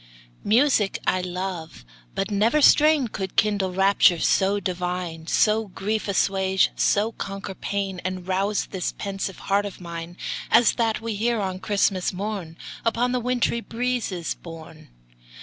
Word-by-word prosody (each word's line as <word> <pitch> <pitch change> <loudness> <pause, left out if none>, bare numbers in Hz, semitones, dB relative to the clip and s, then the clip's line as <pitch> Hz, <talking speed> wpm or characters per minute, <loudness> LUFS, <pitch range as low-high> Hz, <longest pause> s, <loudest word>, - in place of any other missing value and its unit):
Music 225 -2 +3
I 185 - +2
love 180 - -5 0.3
but 195 +2 -2
never 220 +8 +3
strain 300 -2 +5
Could 190 -3 -5
kindle 205 -3 +2
raptures 190 -2 +4
so 200 +1 +2
divine, 180 -3 -4
So 215 +3 +2
grief 210 +3 -3
assuage, 190 -1 +2
so 210 +3 +2
conquer 195 -2 -6
pain, 195 -2 -3
And 185 -1 -4
rouse 195 +2 0
this 185 -3 -3
pensive 195 -1 -4
heart 200 +1 0
of 200 - -10
mine 170 0 -7 0.3
As 230 0 +5
that 225 -2 0
we 230 0 -3
hear 230 +2 0
on 190 -2 -3
Christmas 195 -2 +1
morn, 190 -4 -5 0.3
Upon 235 +2 +1
the 250 - 0
wintry 245 -1 0
breezes 230 -8 -2
borne. 160 -2 -12
195 Hz, 140 wpm, -24 LUFS, 185-220 Hz, 0.3 s, strain